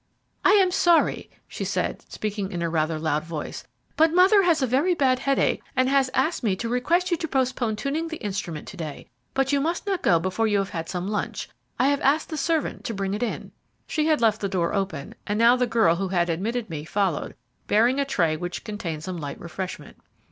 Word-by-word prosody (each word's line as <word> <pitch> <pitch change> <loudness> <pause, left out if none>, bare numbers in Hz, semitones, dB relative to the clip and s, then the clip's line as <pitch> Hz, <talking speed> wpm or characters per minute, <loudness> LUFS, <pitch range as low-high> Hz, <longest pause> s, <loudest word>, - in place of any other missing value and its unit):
"I 380 - +6
am 385 -3 +5
sorry," 345 -2 +3 0.2
she - - -5
said, - - -3
speaking 205 -2 -3
in 175 -3 -3
a 165 - -1
rather 160 0 0
loud 155 -1 0
voice, 160 -2 -6 0.3
"but 320 0 +4
mother 370 +4 +6
has 335 -6 +3
a - - +4
very 280 +9 +2
bad 260 -4 +2
headache, 275 +1 +1
and 255 0 +3
has 275 -1 +3
asked 330 - +1
me 210 -6 +1
to 230 +5 -4
request 335 +10 +1
you 345 - +2
to 325 - -3
postpone 255 -5 0
tuning 290 +8 -2
the 320 -1 -5
instrument 190 - -4
to 190 - -10
day; 155 -6 -7 0.2
but 270 0 +1
you 280 -1 +2
must 335 +6 -1
not 390 -3 -1
go 170 - +4
before 185 +6 0
you 205 -1 +2
have 195 -1 -1
had 165 -4 -4
some 180 0 -3
lunch. 210 0 -3 0.3
I 270 - +3
have 285 -1 +1
asked 295 +4 +2
the 315 - -4
servant 320 +1 -1
to 230 - -3
bring 195 0 -2
it 210 - -3
in." 240 - -3 0.3
She 310 0 0
had 310 -4 +2
left 220 -2 +3
the 200 - -1
door 180 -3 0
open, 195 -8 -3
and 205 - 0
now 235 +2 +6
the 250 -1 +1
girl 225 -8 +3
who 195 +1 -1
had 175 -2 +1
admitted 220 +7 -2
me 155 -4 -5
followed, 185 -1 -1 0.3
bearing 240 +6 +3
a - - +3
tray 170 - +1
which 175 +2 -5
contained 175 -8 -5
some 185 0 -4
light 145 -3 -6
refreshment. 180 +2 -7
220 Hz, 220 wpm, -25 LUFS, 180-280 Hz, 0.3 s, I